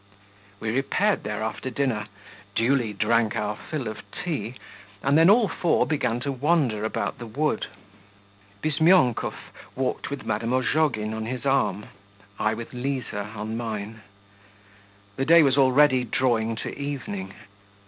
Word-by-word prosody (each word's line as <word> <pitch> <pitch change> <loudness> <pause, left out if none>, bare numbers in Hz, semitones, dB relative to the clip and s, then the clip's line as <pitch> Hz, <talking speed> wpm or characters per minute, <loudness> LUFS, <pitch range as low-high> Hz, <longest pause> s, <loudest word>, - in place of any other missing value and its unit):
We 110 - -2
repaired 180 - +1
there 105 +1 -3
after 110 +3 -3
dinner, 120 -5 -1 0.5
duly 120 -1 +2
drank 115 +2 +1
our 105 0 -1
fill 135 +1 -5
of 110 0 -5
tea, 130 - -4 0.5
and 140 +1 +3
then 165 +3 +7
all 220 +1 +6
four 175 -3 +1
began 125 -6 0
to 140 - -2
wander 135 -5 +1
about 110 - -2
the 120 - -7
wood. 140 +1 -1 1.0
Bizmyonkov 155 -4 +3 0.4
walked 130 0 -2
with 140 -1 -6
Madame 110 +3 -1
Ozhogin 130 -4 +1
on 110 0 -4
his 125 +2 -5
arm, 135 -7 +1 0.5
I 110 +1 +1
with 115 +2 -8
Liza 125 -5 -3
on 110 +1 -4
mine. 110 -1 -5 1.2
The 135 - 0
day 165 +2 +7
was 135 -2 +3
already 135 -1 +5
drawing 115 -2 +1
to - - -5
evening. 125 -10 -5
125 Hz, 140 wpm, -25 LUFS, 110-140 Hz, 1.2 s, then